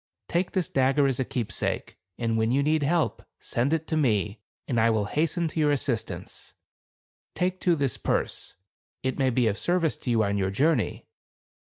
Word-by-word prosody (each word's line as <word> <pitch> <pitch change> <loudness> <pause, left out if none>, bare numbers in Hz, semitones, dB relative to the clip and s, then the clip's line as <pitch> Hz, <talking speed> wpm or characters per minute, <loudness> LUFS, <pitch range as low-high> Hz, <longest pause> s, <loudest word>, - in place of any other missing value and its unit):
Take 175 +1 -1
this 185 -4 0
dagger 135 +2 +2
as 135 -3 +1
Tke - - -5
a - - -1
keepsake, 120 -4 -2 0.2
and 115 -1 0
when 110 +1 +1
you 140 +2 +2
need 155 +1 +2
help, 160 +3 +1 0.2
send 120 +4 -1
^66ei° - - +4
it 160 - -31
to 160 - 0
me, 105 -6 +1 0.3
and 120 -4 +1
I 115 +1 +4
will 110 -2 +1
hasten 165 - 0
to 160 - -4
your 150 -1 +3
assist 125 -6 0
^ 90 - -4
ance. 85 - -10 0.8
Take, 185 +1 0
too, 175 -2 +3
this 140 -6 -1
purse. - - -2 0.5
It 130 +1 -2
may 135 -1 +3
be 125 0 +2
of 110 -1 0
service 175 -3 +1
to - - -6
you 115 -2 +3
on 100 0 0
your 95 -1 +1
journey." 145 +11 +1
135 Hz, 205 wpm, -26 LUFS, 115-155 Hz, 0.8 s, ^66ei°